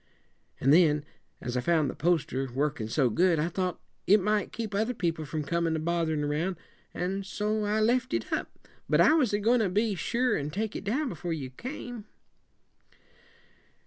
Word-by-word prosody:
An' 135 - +3
then, 150 -3 +5 0.4
as 125 0 -4
I 125 - +1
found 160 0 +2
the - - -3
poster 140 -6 0
worked 135 -4 -1
so 130 +3 +2
good, 175 +6 +3
I 155 +3 0
thought 180 0 -2 0.3
it 205 +3 +6
might 210 +2 0
keep 220 -3 -5
other 220 +5 0
people 165 -5 -1
from 155 +1 -3
comin' 165 +2 0
a - - -1
botherin' 160 -2 0
around, 155 +6 -1 0.4
and 190 +2 -2
so 210 +2 -1
I 210 +1 +1
left 250 +4 +2
it - - -2
up; - - -4 0.2
but - - +3
I - - +6
was 280 -9 +3
a 205 - +2
goin' 230 +4 +3
to 210 -4 +1
be 210 +3 +1
sure 240 +8 0
and 145 +1 -3
take 215 +4 -3
it - - -4
down 265 +9 0
before 175 -8 -4
you 135 -5 -5
came." 245 - -7
180 Hz, 185 wpm, -28 LUFS, 155-215 Hz, 0.4 s, it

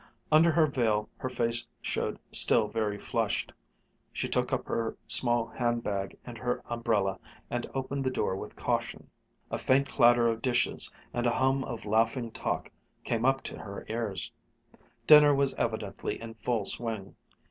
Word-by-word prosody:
Under 160 +2 +6
her 160 0 +4
veil 110 -7 0
her 130 - -4
face 120 -1 -1
showed - - -2
still 110 - +5
very 105 -1 -2
flushed. - - -2 0.6
She - - -3
took - - -1
up - - -1
her 115 -1 -2
small 120 -2 +6
handbag 115 -5 -2
and 120 -2 -9
her 125 0 -2
umbrella 110 -5 -1 0.3
and 120 0 -3
opened 135 +1 -2
the 130 - +1
door 110 -6 -1
with - - -8
caution. - - -3 0.4
A - - -2
faint 135 +2 +2
clatter 120 -2 +5
of 115 -1 -1
dishes 125 -1 +1 0.2
and 120 0 0
a - - +3
hum 135 +1 +2
of 115 - -6
laughing 115 +3 +1
talk 115 - -3 0.3
came 115 +1 -1
up 135 0 +2
to - - -6
her 100 -1 -8
ears. 110 -5 -2 0.7
Dinner 150 -1 +8
was 140 -1 +1
evidently 110 -4 -3
in 115 0 -8
full 110 -1 -2
swing. 110 -4 -3
120 Hz, 160 wpm, -29 LUFS, 110-130 Hz, 0.7 s, Dinner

